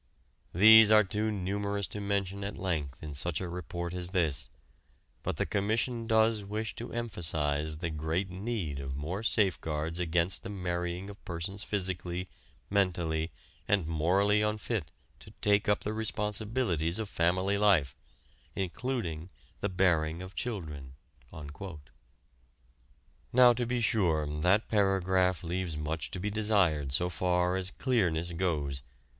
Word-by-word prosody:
These 110 +3 +9
are 110 0 +7
too 105 +3 -1
numerous 100 0 -1
to 105 - -5
mention 100 -1 -1
at 100 +1 -4
length 80 -8 -3
in 75 -1 -6
such 80 +3 -1
a 95 - -4
report 85 0 -5
as 90 -1 -1
this, 80 -7 0 0.7
but - - -3
the - - +1
Commission 115 +3 -1
does 110 -1 +3
wish 105 +2 -3
to 120 - -6
emphasize 80 -9 -1
the 85 0 -3
great 80 +5 -2
need 95 -7 -3
of 65 -1 -4
more 80 +8 -3
safeguards 85 -7 0
against 85 +1 +1
the - - -7
marrying 90 -1 -3
of 100 0 -11
persons 95 +3 -4
physically, 90 -2 -2 0.4
mentally 85 -5 0 0.4
and 100 -5 +2
morally 95 +7 +2
unfit 105 0 -2 0.3
to - - -13
take 105 +1 +2
up 105 - +2
the 105 - -3
responsibilities 105 -5 -1
of 110 -2 -2
family 95 +3 +1
life, 90 -11 +3 0.6
including 95 -4 -3 0.3
the 100 - -1
bearing 85 -3 +1
of 95 +1 -9
children." 75 - -5 2.4
Now 125 0 +7
to 120 0 -2
be 120 0 0
sure 85 -9 +2
that 95 +7 +3
paragraph 95 -3 +2
leaves 85 -2 -2
much 75 +1 -2
to 90 - -5
be 105 +3 -2
desired 100 -10 +2
so 85 +6 +2
far 90 0 +1
as 95 0 -2
clearness 90 -10 0
goes. 75 -6 -1
95 Hz, 135 wpm, -30 LUFS, 85-105 Hz, 2.4 s, These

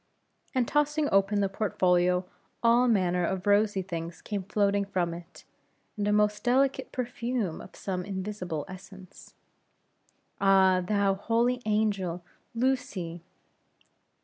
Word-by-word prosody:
and 250 -3 +2
tossing 295 0 +1
open 195 +1 +3
the 200 - +2
portfolio, 180 -3 +1 0.4
all 235 +2 +5
manner 180 -5 +2
of 185 +2 -2
rosy 205 -1 +3
things 170 -2 -6
came 205 -2 -4
floating 200 +1 +1
from 180 -4 -1
it, 170 +1 -11 0.5
and 205 -1 -2
a - - +2
most 210 0 +2
delicate 265 +2 +1
perfume 245 - -3
of - - -13
some 185 -2 -4
invisible 190 -5 -4
essence. 185 0 -13 1.0
"Ah! 190 -1 +4
thou 200 0 +2
holy 235 +5 0
angel, 200 -5 0 0.3
Lucy!" 205 -9 -1
200 Hz, 120 wpm, -28 LUFS, 180-220 Hz, 1.0 s, all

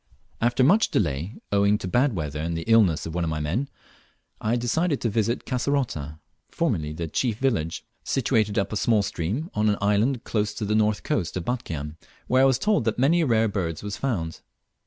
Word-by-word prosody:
After 120 +2 +3
much 200 +11 +4
delay, 80 +2 -1 0.2
owing 100 +1 +3
to 90 - -6
bad 125 +5 +2
weather 75 -3 -3
and 85 +1 -2
the 85 - -4
illness 105 -6 +3
of 80 - -5
one 90 0 -1
of 80 - -1
my 80 -1 -2
men, 90 - -1 0.7
I 110 +2 +1
determined 140 +6 0
to 115 - +1
visit 115 +2 0
Kasserota 125 - -1 0.3
(formerly 75 -1 -1
the 80 +2 -4
chief 110 - -1
village), 110 -12 -1 0.2
situated 115 -5 +1
up 100 +1 0
a - - 0
small 110 -1 +2
stream, 100 - -3
on 105 0 +2
an 105 - +1
island 105 +5 +1
close 105 -2 -1
to 110 - -3
the 105 - 0
north 110 -1 +2
coast 100 - -1
of 85 - -4
Batchian; 80 - -4 0.3
where 130 +1 +3
I - - +6
was 135 -2 +4
told 180 - +1
that 110 - 0
many 160 +7 +3
rare 115 -5 +3
birds 90 -6 -3
were 105 - -4
found. 95 - -3
105 Hz, 200 wpm, -25 LUFS, 85-125 Hz, 0.7 s, I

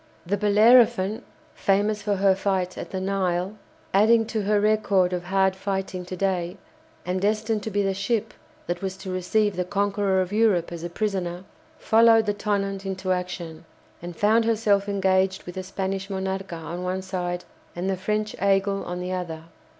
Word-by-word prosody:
The 195 +4 0
"Bellerophon" 210 0 +4 0.3
(famous 205 +2 +1
for 205 0 0
her 195 0 +4
fight 190 -2 -1
at - - -7
the 190 - -3
Nile, 190 0 -1 0.4
adding 225 +3 +5
to 220 - 0
her 205 +1 +2
record 205 -3 +2
of 175 -1 -3
hard 190 0 +2
fighting 190 -2 -3
to 185 +1 -6
day, 180 -2 -1 0.5
and 180 +1 -1
destined 215 +1 0
to 220 - -4
be 205 0 0
the 195 0 0
ship 215 +3 -1 0.3
that 175 0 -3
was 190 -1 -4
to 190 -1 -7
receive 205 +3 +1
the 180 - 0
conqueror 200 0 0
of 185 +1 -1
Europe 210 -6 +2
as 170 -1 -6
a 175 - -3
prisoner) 185 -2 -2 0.3
followed 225 0 +5
the 205 - +1
"Tonnant" 200 -1 -2
into 190 -1 -3
action, 180 -3 -4 0.4
and 175 0 -7
found 220 +5 +3
herself 210 -3 +2
engaged 190 -1 +1
with 180 - -8
the 185 - -4
Spanish 195 +1 -4
"Monarca" 190 -1 -3
on 165 +2 -6
one 185 +1 -2
side, 180 -2 -3 0.3
and 175 +2 -3
the 195 - +1
French 210 +3 -2
"Aigle" 195 0 +1
on 180 0 -5
the 180 +1 -4
other. 170 -3 -4
195 Hz, 175 wpm, -25 LUFS, 185-205 Hz, 0.5 s, adding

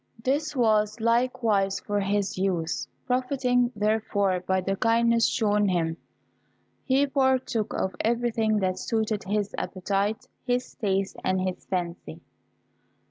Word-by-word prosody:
This 290 +4 0
was 215 -2 +2
likewise 230 -4 +1
for 205 0 -2
his 200 0 0
use. 180 -3 -1 0.2
Profiting, 250 -1 +1
therefore, 205 -3 +1
by 190 +1 0
the 195 +1 -1
kindness 230 +2 +3
shown 210 -3 +2
him, 165 -3 0 0.9
he 270 +1 +3
partook 260 -5 +1
of 190 -1 -2
everything 225 -2 +1
that 185 0 0
suited 220 -1 -1
his 205 0 -1
appetite, 200 +3 -2 0.2
his 250 0 -1
taste, 195 -3 -1
and 185 0 +1
his 185 -1 -4
fancy. 175 - -4
210 Hz, 120 wpm, -26 LUFS, 195-240 Hz, 0.9 s, kindness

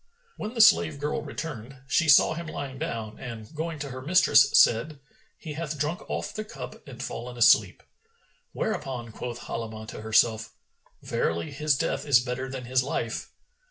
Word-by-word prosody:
When 215 +3 -6
the 230 - +3
slave 180 -9 +5
girl 150 +1 -2
returned, 135 -4 -7
she 160 +3 +2
saw 145 - +7
him 170 +1 -6
lying 135 -4 -6
down 110 -2 -5
and 115 +1 -8
going 160 +1 -4
to 145 -1 -5
her 130 +1 -7
mistress 175 +7 +5
said, 135 +6 +3 0.4
"He 155 - -7
hath 155 -1 -4
drunk 150 +5 -3
off - - -3
the 215 - -4
cup 215 - -10
and - - -8
fallen 125 +1 -6
asleep;" 120 - +4 0.7
whereupon 130 - -3
quoth 120 +1 -6
Halimah 110 -1 -6
to - - -8
herself, 110 0 +2 0.5
"Verily, 85 0 -1
his 150 -2 +1
death 160 0 -2
is 135 -4 +6
better 125 +1 -4
than 130 -2 -6
his 125 +1 +2
life." 135 - -3
135 Hz, 165 wpm, -27 LUFS, 115-155 Hz, 0.7 s, saw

